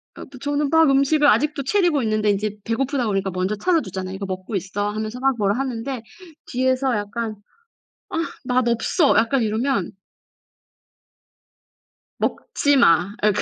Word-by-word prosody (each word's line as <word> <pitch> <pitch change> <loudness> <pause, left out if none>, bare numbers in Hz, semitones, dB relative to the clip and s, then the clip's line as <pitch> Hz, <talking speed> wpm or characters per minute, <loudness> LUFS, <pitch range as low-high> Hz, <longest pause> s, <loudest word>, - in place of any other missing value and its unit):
아 - - -9 0.2
저는 290 0 0
막 320 -1 +5
음식을 280 +2 +3
아직도 285 +4 +2
차리고 340 -3 +2
있는데 215 -1 +1
인제 205 +1 -1
배고프다 250 +2 -1
그러니까 195 -2 -1
먼저 185 +3 -1
찾아주잖아요. 195 - -1
"이거 195 +1 -5
먹고 185 +2 -5
있어." 200 +2 -2
하면서 215 +3 -4
막 270 0 +2
뭐라 205 0 +1
하는데 255 -1 -3 0.4
뒤에서 260 0 0
약간 215 +2 -3 0.7
"아 - - -5 0.3
맛없어." 250 +4 +2
약간 230 +4 +2
이러면 220 -1 -1 2.3
"먹지 285 0 0
마." 180 -3 +4
아 210 - +3
약간 210 -1 +2
230 Hz, 310 characters per minute, -22 LUFS, 205-275 Hz, 2.3 s, 막